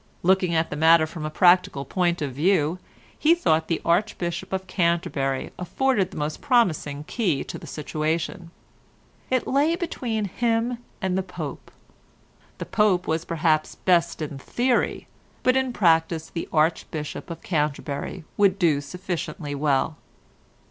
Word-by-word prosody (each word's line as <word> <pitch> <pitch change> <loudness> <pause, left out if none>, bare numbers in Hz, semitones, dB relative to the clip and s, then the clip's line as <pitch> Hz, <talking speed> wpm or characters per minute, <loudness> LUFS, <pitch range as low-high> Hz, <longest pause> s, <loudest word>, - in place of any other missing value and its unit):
Looking 185 -1 +3
at 160 0 +1
the - - -2
matter 160 +1 +5
from 155 0 -7
a - - -2
practical 175 -4 +3
point 175 +1 0
of 140 -3 -3
view 165 +2 +2 0.4
he 325 +3 +5
thought 160 - +1
the 165 - 0
Archbishop 175 -1 0
of 190 0 -2
Canterbury 170 -7 0
afforded 195 +2 +1
the - - -10
most 150 0 -3
promising 170 - +1
key 175 - -1
to - - -7
the - - -11
situation. 160 +3 -3 0.8
It 255 -1 +1
lay 290 +5 +2
between 240 - -2
him 230 +4 0 0.2
and 185 -1 0
the 190 - +1
Pope. 180 -1 -7 0.9
The - - -5
Pope 210 -5 +2
was 160 +1 -1
perhaps 160 -2 +1
best 170 -3 +1
in 145 -2 -6
theory, 245 - 0 0.4
but 255 0 +4
in 265 -1 +1
practice 165 -5 +2
the 165 - -5
Archbishop 155 0 -1
of 170 -1 -7
Canterbury 150 +1 -2
would 200 -2 +4
do 160 -7 +2
sufficiently 155 -2 -5
well. 145 +1 0
170 Hz, 140 wpm, -24 LUFS, 155-195 Hz, 0.9 s, matter